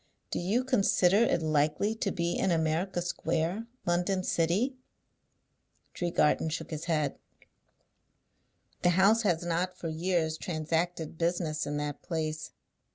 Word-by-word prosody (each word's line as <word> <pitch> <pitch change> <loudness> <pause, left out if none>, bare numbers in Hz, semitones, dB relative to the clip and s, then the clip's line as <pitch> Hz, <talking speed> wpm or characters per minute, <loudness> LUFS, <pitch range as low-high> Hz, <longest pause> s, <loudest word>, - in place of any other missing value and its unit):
Do - - -1
you 205 +8 +1
consider 200 -6 +3
it 215 -7 +3
likely 155 +7 +1
to 220 - -2
be 170 -2 -1
in - - +1
America 170 +2 0
Square, 175 +5 -1 0.2
London 180 +2 +1
City?" 185 +12 +1 1.2
Tregarthen 170 -2 +1
shook 160 - -5
his 155 0 -4
head. 155 -4 0 1.6
"The 175 0 +3
house 210 +4 +5
has 175 -6 +1
not, 180 +2 -1
for 165 - -4
years, 160 -1 0
transacted 165 0 -2
business 165 -3 0
in 145 0 -2
that 145 -1 -3
place. 155 -2 -3
170 Hz, 125 wpm, -30 LUFS, 160-185 Hz, 1.6 s, house